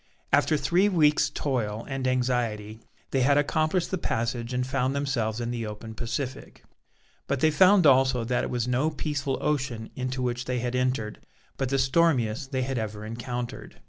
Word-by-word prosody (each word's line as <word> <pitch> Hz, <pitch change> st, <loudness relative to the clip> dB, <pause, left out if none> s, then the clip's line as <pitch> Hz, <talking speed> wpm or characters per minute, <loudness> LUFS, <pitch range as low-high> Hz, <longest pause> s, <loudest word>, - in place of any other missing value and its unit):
After 155 Hz, -, +4 dB
three 175 Hz, +9 st, +2 dB
weeks' 150 Hz, -6 st, +3 dB
toil 115 Hz, -6 st, -2 dB
and 135 Hz, -1 st, -2 dB
anxiety, 120 Hz, -4 st, -1 dB, 0.3 s
they 135 Hz, -, +1 dB
had 140 Hz, +3 st, +4 dB
accomplished 155 Hz, +4 st, +1 dB
the 190 Hz, -, -1 dB
passage 115 Hz, -1 st, -2 dB
and 125 Hz, 0 st, 0 dB
found 130 Hz, +1 st, 0 dB
themselves 120 Hz, -6 st, -1 dB
in 120 Hz, 0 st, -2 dB
the 115 Hz, -2 st, -3 dB
open 105 Hz, +1 st, -7 dB
Pacific. 120 Hz, +4 st, -5 dB, 0.6 s
But 140 Hz, -, 0 dB
they 155 Hz, +3 st, +4 dB
found 185 Hz, +3 st, +5 dB
also 130 Hz, -3 st, +5 dB
that 125 Hz, +2 st, 0 dB
it -, -, -2 dB
was 120 Hz, -1 st, -1 dB
no 130 Hz, +5 st, +1 dB
peaceful 140 Hz, -3 st, -2 dB
ocean 130 Hz, -7 st, -2 dB
into 130 Hz, 0 st, -3 dB
which 120 Hz, 0 st, -2 dB
they 125 Hz, -, -1 dB
had 120 Hz, 0 st, -2 dB
entered, 125 Hz, -4 st, -1 dB, 0.4 s
but 135 Hz, -2 st, -2 dB
the 135 Hz, -, +1 dB
stormiest 135 Hz, -3 st, +2 dB
they 130 Hz, -1 st, 0 dB
had 130 Hz, -1 st, -2 dB
ever 105 Hz, -1 st, -5 dB
encountered. 120 Hz, +2 st, -6 dB
130 Hz, 175 wpm, -27 LUFS, 120-140 Hz, 0.6 s, found